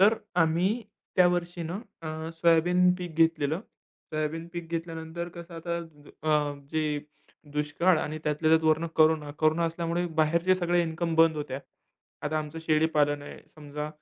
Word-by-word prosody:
तर 210 Hz, +4 st, +7 dB, 0.3 s
आम्ही 180 Hz, +9 st, +1 dB, 0.3 s
त्यावर्षी 175 Hz, -1 st, +2 dB
ना, 165 Hz, +2 st, -4 dB, 0.3 s
अ, 160 Hz, +1 st, -5 dB
सोयाबीन 175 Hz, +2 st, +4 dB
पीक 175 Hz, -3 st, -6 dB
घेतलेलं. 160 Hz, 0 st, +2 dB, 0.5 s
सोयाबीन 155 Hz, +2 st, -2 dB
पीक 170 Hz, -1 st, -6 dB
घेतल्यानंतर 165 Hz, 0 st, -4 dB
कसं 170 Hz, 0 st, -9 dB
आता 170 Hz, +1 st, -3 dB, 0.5 s
अ, 150 Hz, -2 st, +2 dB, 0.2 s
जे 150 Hz, -2 st, 0 dB, 0.5 s
दुष्काळ 150 Hz, +4 st, +2 dB
आणि 155 Hz, +1 st, -3 dB
त्यातल्या 150 Hz, +1 st, +1 dB
त्यात 160 Hz, 0 st, +4 dB
वरनं 160 Hz, +2 st, +2 dB
कोरोना. 155 Hz, -2 st, +4 dB
कोरोना 160 Hz, +2 st, +3 dB
असल्यामुळे 170 Hz, +1 st, -1 dB
बाहेरचे 170 Hz, +4 st, +3 dB
सगळे 175 Hz, -1 st, +2 dB
इन्कम 165 Hz, 0 st, -2 dB
बंद 165 Hz, -1 st, +5 dB
होत्या. 135 Hz, -2 st, -4 dB, 0.6 s
आता 155 Hz, +1 st, 0 dB
आमचं 155 Hz, +1 st, -5 dB
शेळीपालन 150 Hz, -2 st, +2 dB
आहे. -, -, -9 dB, 0.2 s
समजा 150 Hz, 0 st, -6 dB
160 Hz, 140 wpm, -28 LUFS, 155-170 Hz, 0.6 s, तर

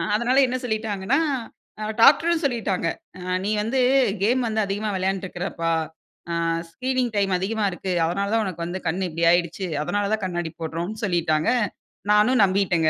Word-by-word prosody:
அதனால 240 Hz, +4 st, +1 dB
என்ன 255 Hz, +1 st, -1 dB
சொல்லிட்டாங்கன்னா. 220 Hz, +2 st, 0 dB, 0.6 s
அ -, -, -2 dB, 0.2 s
டாக்டர்ம் 325 Hz, +6 st, +5 dB
சொல்லிட்டாங்க. 220 Hz, -10 st, 0 dB, 0.3 s
அ -, -, -9 dB, 0.2 s
"நீ -, -, 0 dB
வந்து 230 Hz, +5 st, -1 dB, 0.4 s
கேம் 245 Hz, +6 st, +2 dB
வந்து 220 Hz, -1 st, -1 dB
அதிகமா 205 Hz, +2 st, -2 dB
விளையான்ருக்குறப்பா. 185 Hz, -3 st, -2 dB, 0.6 s
ஆ -, -, -1 dB, 0.4 s
ஸ்கிரீனிங் 255 Hz, +4 st, -1 dB
டைம் 200 Hz, -2 st, +1 dB
அதிகமா 210 Hz, +3 st, -1 dB
இருக்கு. 185 Hz, +1 st, -4 dB
அதனால 195 Hz, +4 st, -1 dB
தான் 225 Hz, -1 st, +2 dB
உனக்கு 175 Hz, -3 st, -4 dB
வந்து 175 Hz, +2 st, -4 dB
கண் 180 Hz, +4 st, -1 dB
இப்டி 165 Hz, 0 st, -4 dB
ஆய்டுச்சு. 175 Hz, +2 st, 0 dB, 0.2 s
அதனால 205 Hz, +5 st, -1 dB
தான் 220 Hz, -, -1 dB
கண்ணாடி 175 Hz, -3 st, -3 dB
போட்றோம்னு" 170 Hz, +8 st, -4 dB
சொல்லிட்டாங்க. 160 Hz, -4 st, +1 dB, 0.6 s
நானும் 215 Hz, +4 st, +4 dB
நம்பிட்டேங்க. 185 Hz, -4 st, +2 dB
195 Hz, 150 wpm, -23 LUFS, 175-225 Hz, 0.6 s, டாக்டர்ம்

